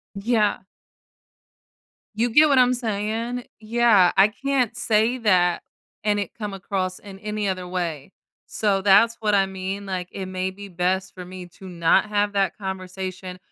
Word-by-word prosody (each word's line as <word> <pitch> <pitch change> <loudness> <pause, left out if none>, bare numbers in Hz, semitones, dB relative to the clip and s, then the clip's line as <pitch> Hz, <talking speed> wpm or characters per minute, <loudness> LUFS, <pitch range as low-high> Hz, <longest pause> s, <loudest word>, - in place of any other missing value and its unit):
Yeah. 210 0 +1 1.5
You 235 +2 +2
get 300 +7 +6
what 280 -2 +3
I'm 250 0 +5
saying? 230 +1 -3 0.2
Yeah, 220 -5 +4
I 195 +2 +6
can't 255 0 -1
say 225 +3 +2
that, 185 -7 +2 0.4
and 210 -1 +2
it 200 -3 -3
come 210 -3 -6
across 190 -1 -3
in 195 -1 -12
any 210 -1 -2
other 185 -1 -4
way. 175 -4 -4 0.3
So, 200 -3 0
that's 215 +4 +5
what 210 -2 +1
I 195 -1 +4
mean, 190 +1 -5
like, 185 -2 -4
it 190 -1 -5
may 185 0 -2
be 200 +1 -10
best 185 +2 -1
for 180 -1 -9
me 180 0 -9
to 190 - -11
not 170 +1 +2
have 205 -1 0
that 195 -1 0
conversation, 185 -1 -6
200 Hz, 160 wpm, -23 LUFS, 185-220 Hz, 1.5 s, get